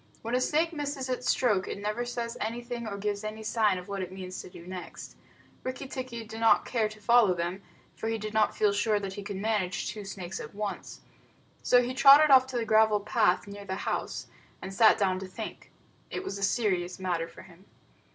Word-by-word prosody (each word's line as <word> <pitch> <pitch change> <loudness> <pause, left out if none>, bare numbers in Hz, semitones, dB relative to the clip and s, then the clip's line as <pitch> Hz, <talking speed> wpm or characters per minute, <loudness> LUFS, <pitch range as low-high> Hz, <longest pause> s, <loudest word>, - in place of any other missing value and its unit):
When 230 +2 -4
a 250 - +2
snake 325 +5 +1
misses 285 -3 -3
its 250 0 -2
stroke, 210 -7 +2
it - - -4
never 210 +4 -2
says 235 -1 -4
anything 235 +1 -4
or 200 -2 -4
gives 205 0 -2
any 215 +1 -5
sign 215 -3 +2
of 180 - -8
what 200 -1 -4
it 185 -1 -5
means 185 -1 -7
to - - -11
do 175 -2 -12
next. 185 0 -8 0.5
Rikki 255 +1 -5
tikki 255 -3 -5
did 225 0 -9
not 225 0 +4
care 225 -3 0
to 215 0 -12
follow 215 -3 +5
them, 175 +3 -3 0.3
for 225 - -4
he 225 - 0
did 215 0 -6
not 215 -1 +2
feel 210 -1 +3
sure 210 +1 +1
that 195 -1 -5
he 205 - -6
could 200 0 -6
manage 195 -3 -1
two 210 +1 -6
snakes 190 -2 -6
at 150 - -9
once. 210 -1 -5 0.6
So 245 0 +5
he 250 +1 -3
trotted 280 +3 +8
off 260 -1 +7
to 260 -2 -4
the 230 - -1
gravel 220 -1 +4
path 210 -3 +2
near 200 0 -9
the 190 -1 -4
house, - - -2 0.3
and 190 - -7
sat 220 +2 +6
down 190 -2 +1
to 190 - -6
think. 185 - -8 0.4
It 380 - -4
was 200 - -5
a - - -3
serious 185 -5 0
matter 175 -3 -2
for - - -13
him. 185 +1 -18
215 Hz, 220 wpm, -29 LUFS, 190-240 Hz, 0.6 s, trotted